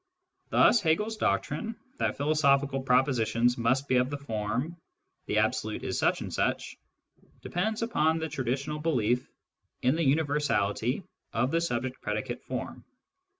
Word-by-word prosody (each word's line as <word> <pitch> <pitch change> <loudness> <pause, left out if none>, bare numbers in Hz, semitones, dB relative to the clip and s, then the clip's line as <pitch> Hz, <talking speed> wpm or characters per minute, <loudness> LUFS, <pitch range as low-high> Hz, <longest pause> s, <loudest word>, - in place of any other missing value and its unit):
Thus 235 - +5
Hegel's 210 +7 +1
doctrine, 150 - -1 0.2
that - - 0
philo 145 +2 +1
sophical 140 -2 +2
propositions 125 -2 +2
must 130 +4 +1
be 130 - +3
of 125 +1 +2
the 145 - -3
form, 125 +4 -3 0.3
" 380 -1 -50
the - - 0
Absolute - - 0
is - - -2
such - - +2
and - - -5
such," - - -1 0.7
depends 220 +1 -1
upon 160 -9 +2
the 160 0 -2
traditional 140 +2 -2
belief 125 -6 +1 0.5
in 130 +4 +3
the 165 - 0
universality 140 - +1 0.3
of 120 +4 +1
the 165 - +2
subject 130 -4 -2
predicate 110 +4 -3
form. - - -5
140 Hz, 145 wpm, -29 LUFS, 125-160 Hz, 0.7 s, Thus